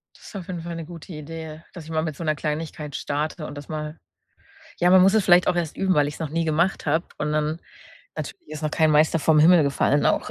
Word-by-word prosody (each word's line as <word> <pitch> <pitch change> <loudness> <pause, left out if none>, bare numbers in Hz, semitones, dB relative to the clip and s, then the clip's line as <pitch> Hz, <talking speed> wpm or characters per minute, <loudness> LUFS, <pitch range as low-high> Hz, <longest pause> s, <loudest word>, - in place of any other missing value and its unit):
Das - - -18
ist - - -12
auf 185 -3 -6
jeden 175 -3 -5
Fall 170 0 -6
'ne 165 -1 -6
gute 170 +1 -10
Idee, 160 +1 -8
dass 170 -4 -9
ich - - -12
mal 155 0 0
mit 155 -3 -4
so 170 - -7
'ner 155 -1 +1
Kleinigkeit 150 -1 -4
starte 150 +2 -3
und - - -8
das 145 - -10
mal 155 0 -5 0.8
Ja, 175 - +4
man 185 0 +7
muss 195 +2 +5
es 220 -3 +3
vielleicht 180 0 +5
auch - - +2
erst 170 -3 -2
üben, 190 -1 +2
weil 145 -2 +3
ich's 150 - -7
noch 160 - -3
nie 165 +2 -1
gemacht 165 +4 0
habe 160 +3 +1
und 150 0 -2
dann 155 +2 -1 0.6
Natürlich 360 - -7
ist 155 0 -7
noch 155 - -1
kein 160 -1 +3
Meister 155 +2 +4
vom 155 0 +4
Himmel 165 +1 +7
gefallen 140 0 +1
auch, - - +1
160 Hz, 255 wpm, -24 LUFS, 150-170 Hz, 0.8 s, man